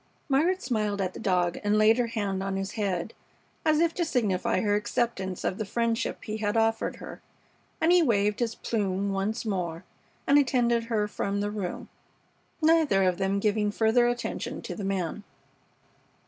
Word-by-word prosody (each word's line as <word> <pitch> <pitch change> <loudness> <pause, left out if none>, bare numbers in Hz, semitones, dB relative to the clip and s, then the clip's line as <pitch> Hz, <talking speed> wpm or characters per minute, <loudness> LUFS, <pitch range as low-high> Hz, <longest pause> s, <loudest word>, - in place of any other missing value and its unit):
Margaret 335 +8 +2
smiled 215 -5 -1
at 185 -1 -1
the - - -8
dog 180 -4 +1
and 205 +1 +2
laid 220 +3 +5
her 240 - +1
hand 205 -4 -2
on 195 0 -2
his 195 0 -3
head, 200 -3 -2 0.5
as 310 -1 +3
if 335 0 +2
to 350 - -1
signify 230 - 0
her 205 -1 +1
acceptance 205 -3 -1
of 185 - -2
the - - 0
friendship 230 +2 -1
he 215 -1 -4
had 210 0 -1
offered 225 0 +1
her, - - -10 0.6
and 325 - +3
he 355 0 +6
waved 210 -7 +2
his 235 -2 -1
plume 200 -3 -1
once 200 +4 -2
more 180 -5 -3 0.4
and 285 +1 +5
attended 240 -4 +2
her 220 -3 0
from 200 -1 -2
the 205 0 -1
room, 200 -4 -4 0.8
neither 310 -11 +4
of 185 -2 +1
them 195 +1 +1
giving 210 0 +1
further 225 +3 +3
attention 240 -1 -3
to - - -5
the 210 - -6
man. 195 -1 -2
215 Hz, 175 wpm, -27 LUFS, 195-235 Hz, 0.8 s, he